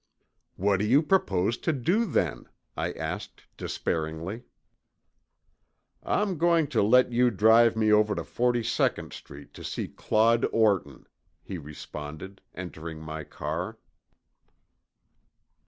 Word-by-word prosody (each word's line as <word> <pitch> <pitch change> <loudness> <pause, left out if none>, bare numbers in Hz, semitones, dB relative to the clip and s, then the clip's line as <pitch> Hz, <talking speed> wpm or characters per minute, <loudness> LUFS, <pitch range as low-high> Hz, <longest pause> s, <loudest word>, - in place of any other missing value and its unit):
"What 100 +1 +2
do 105 - 0
you 135 +7 +5
propose 115 - +1
to 165 - 0
do 170 - +1
then?" 180 - -1 0.3
I - - -2
asked - - -6
despairingly. 80 +7 -3 1.6
"I'm 195 -6 -1
going 170 -1 +4
to - - +1
let 125 +5 +4
you 125 +1 +4
drive 110 +2 +5
me 110 -1 +2
over 105 0 +3
to - - -3
Forty 120 -1 0
second - - 0
Street 70 0 -12
to - - -11
see - - -4
Claude 115 +2 +2
Orton," 100 - +1 0.4
he 95 - -6
responded, 75 +4 -9
entering 85 -3 -7
my 80 0 -6
car. 85 +9 -5
105 Hz, 120 wpm, -27 LUFS, 80-120 Hz, 1.6 s, you